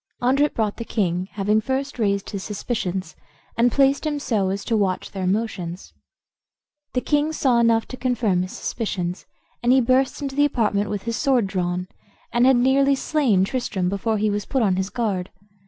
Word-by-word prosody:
Andret 275 +4 +2
brought 215 -2 -1
the 230 - -4
king, 185 -5 -1
having 210 +1 +1
first 265 +2 -3
raised 200 -2 0
his 200 -2 -4
suspicions, 190 -5 -3 0.4
and 240 +1 +3
placed 275 +1 +3
him 305 -2 -1
so 210 -8 0
as 200 +1 -3
to 230 - 0
watch 195 -4 0
their 190 -2 -3
motions. 185 -4 -3 1.0
The 250 - +1
king 295 +2 +1
saw 260 -6 +2
enough 230 -1 +3
to 255 - -7
confirm 230 -8 +1
his 185 +1 -4
suspicions, 180 -6 -3 0.3
and 240 +1 +3
he 265 - +6
burst 255 +2 +2
into 275 -2 -4
the 290 - +4
apartment 210 -7 +1
with 205 -2 -3
his 230 -1 -2
sword 255 -5 +2
drawn, 180 -1 -2 0.5
and 240 +1 +4
had 265 - +6
nearly 275 +2 +4
slain 265 -10 +2
Tristram 195 -5 -1
before 215 +3 -1
he 210 0 +1
was 205 0 -2
put 265 -4 +1
on 190 -4 +2
his 190 +1 -2
guard. 200 -6 -2
225 Hz, 185 wpm, -23 LUFS, 195-255 Hz, 1.0 s, he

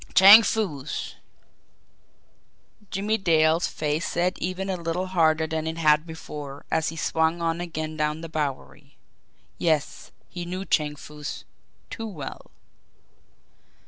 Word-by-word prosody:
Chang 200 +4 +10
Foo's! 180 -10 -2 1.8
Jimmie 210 +3 -1
Dale's 160 -2 +3
face 155 +1 -2
set 180 +1 0
even 185 +2 -3
a 190 - -1
little 170 +1 -2
harder 160 -4 +2
than 160 0 -3
it 160 0 -3
had 155 0 +3
before, 150 -3 -8
as 160 0 +1
he 165 - -7
swung 160 +1 0
on 165 0 -1
again 155 -2 -5
down 150 +1 -1
the 165 - -6
Bowery. 140 - -5 0.6
Yes; 155 -4 -1 0.2
he 175 -1 -6
knew 185 +2 -5
Chang 150 -3 +1
Foo's 150 0 -8 0.5
too 225 - -5
well. 160 -10 -8
160 Hz, 125 wpm, -25 LUFS, 150-180 Hz, 1.8 s, Chang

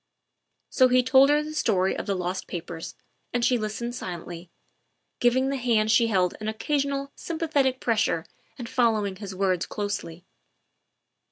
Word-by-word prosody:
So 255 - +5
he 250 0 +4
told 265 +2 +6
her 295 +1 +3
the 310 0 -7
story 190 -10 +1
of - - -5
the 200 - 0
lost 180 +1 -3
papers 170 -1 -6 0.4
and 245 -1 +1
she 250 -2 +2
listened 225 +3 -4
silently, 175 -4 -7 0.7
giving 260 +2 +3
the 275 - -1
hand 225 -4 +2
she 230 +1 +4
held 185 -5 +1
an 215 - -4
occasional 275 +4 -1
sympathetic 295 -6 0
pressure 220 -8 0 0.3
and 240 -3 -6
following 220 -6 +1
his 195 -2 -7
words 185 -2 0
closely. 195 -5 -4
225 Hz, 150 wpm, -26 LUFS, 190-260 Hz, 0.7 s, told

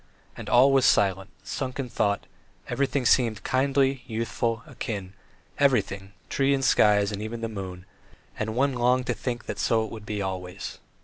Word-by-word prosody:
And - - -7
all 130 +3 +6
was 135 -2 +4
silent, 95 0 +2
sunk 130 -1 -4
in 135 - -2
thought; 100 -3 0 0.4
everything 140 0 0
around - - +2
seemed 115 -4 +3
kindly, 135 0 +1
youthful, 115 0 -2
akin, 105 -9 -5 0.5
everything 100 -8 +1
trees 140 0 +2
and 135 -1 -1
sky 105 -5 +5
and 100 0 -1
even 115 +2 -5
the 115 - -1
moon, 95 -4 -7 0.5
and 110 0 -2
one 135 +2 +2
longed 125 +1 +2
to - - 0
think 120 -2 -4
that - - -5
so 110 -1 +2
it - - -9
would 110 -2 -9
be 105 -1 -3
always. 95 0 -5
115 Hz, 175 wpm, -26 LUFS, 100-130 Hz, 0.5 s, all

